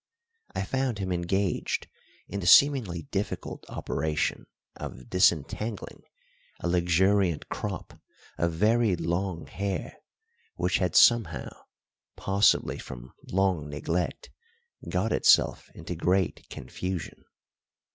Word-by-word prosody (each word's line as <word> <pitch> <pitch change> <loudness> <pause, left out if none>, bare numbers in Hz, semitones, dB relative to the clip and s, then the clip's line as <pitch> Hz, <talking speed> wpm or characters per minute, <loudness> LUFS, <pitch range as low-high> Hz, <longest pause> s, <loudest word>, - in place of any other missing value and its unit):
I 95 - -1
found 130 +1 -1
him 95 -2 -3
engaged 90 +2 -1 0.4
in 100 - -4
the 90 - -3
seemingly 110 - +5
difficult - - -3
operation 80 -1 -2 0.3
of 65 - -9
disentangling 90 +5 0 0.6
a - - -3
luxuriant 90 0 +2
crop - - -6 0.4
of 85 0 +1
very 110 +4 +2
long 85 0 -2
hair, 100 -1 -4 0.6
which - - 0
had - - -1
somehow 115 - +4 0.6
possibly 100 +1 +2
from - - -10 0.2
long 90 -6 +1
neglect 80 +4 -3 0.6
got 95 +5 0
itself - - +4
into 80 +2 -6
great 90 +2 0
confusion. 90 +7 -6
90 Hz, 100 wpm, -27 LUFS, 85-100 Hz, 0.6 s, seemingly